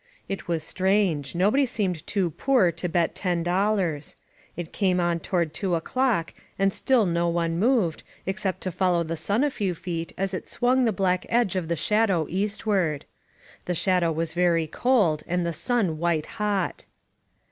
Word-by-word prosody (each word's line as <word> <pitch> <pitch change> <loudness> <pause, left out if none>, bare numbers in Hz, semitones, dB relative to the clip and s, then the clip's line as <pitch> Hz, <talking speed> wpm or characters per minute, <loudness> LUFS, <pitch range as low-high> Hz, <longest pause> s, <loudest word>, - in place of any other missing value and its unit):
'* - - -37
It - - -15
was 165 -2 -1
strange; 185 -6 0
nobody 215 +10 +3
seemed 190 -9 -2
too 190 -5 0
poor 240 - +3
to 170 +2 -4
bet 170 -1 +1
ten 175 -3 -1
dollars. 180 -4 0 0.4
It 175 -2 -6
came 185 -3 +1
on 175 -1 +1
toward 170 -3 -1
two 185 0 -1
o'clock, 220 0 0 0.2
and 195 0 +2
still 255 -5 +2
no 170 -1 +1
one 170 0 0
moved, 215 -8 +2 0.2
except 190 0 -2
to 185 - -2
follow 180 -1 +1
the 165 +1 -3
sun 205 - 0
a 295 - +1
few 195 -8 -2
feet 165 -1 -4
as 195 0 -2
it 185 - -5
swung 255 +1 +2
the 225 - +3
black 185 -2 0
edge 235 -6 +2
of 180 -3 -1
the 170 - 0
shadow 200 -3 +2
eastward. 195 -5 0 0.6
The 180 - -1
shadow 180 -1 +2
was 165 +1 -2
very 170 -2 +2
cold, 175 - +2
and 180 0 0
the 170 - -1
sun 175 -2 0
white 170 -2 0
hot. 205 -3 -2
180 Hz, 175 wpm, -25 LUFS, 170-205 Hz, 0.6 s, nobody